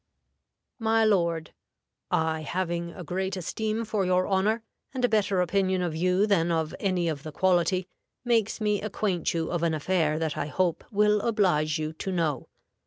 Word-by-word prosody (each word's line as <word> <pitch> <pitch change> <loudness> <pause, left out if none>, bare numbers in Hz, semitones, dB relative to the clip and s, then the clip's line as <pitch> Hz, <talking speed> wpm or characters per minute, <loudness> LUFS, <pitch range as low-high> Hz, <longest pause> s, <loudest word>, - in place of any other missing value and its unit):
"MY 225 0 +3
LORD, 170 -6 +1 0.6
I 160 0 +1
having 170 +1 -2
a 180 - -9
great 190 +3 -2
esteem 220 +5 -2
for 210 -2 0
your 185 0 +2
honor, 210 +4 +1 0.3
and 250 -1 +2
a - - +4
better 205 -4 +2
opinion 185 0 +1
of 170 -3 -2
you 180 +4 +2
than 180 -5 +2
of 160 -2 -1
any 185 -4 0
of 155 -4 -2
the 155 +1 -7
quality, 185 +2 +2 0.4
makes 230 -3 +1
me 210 -2 +1
acquaint 200 -4 -1
you 165 -1 -1
of 175 -2 -1
an 165 -2 +1
affair 155 -1 +1
that 160 -2 -2
I 145 - -2
hope 175 +1 0
will 210 0 +3
oblige 180 -9 +2
you 155 0 -3
to 190 +4 -4
know. 160 -7 -1
185 Hz, 175 wpm, -27 LUFS, 165-205 Hz, 0.6 s, a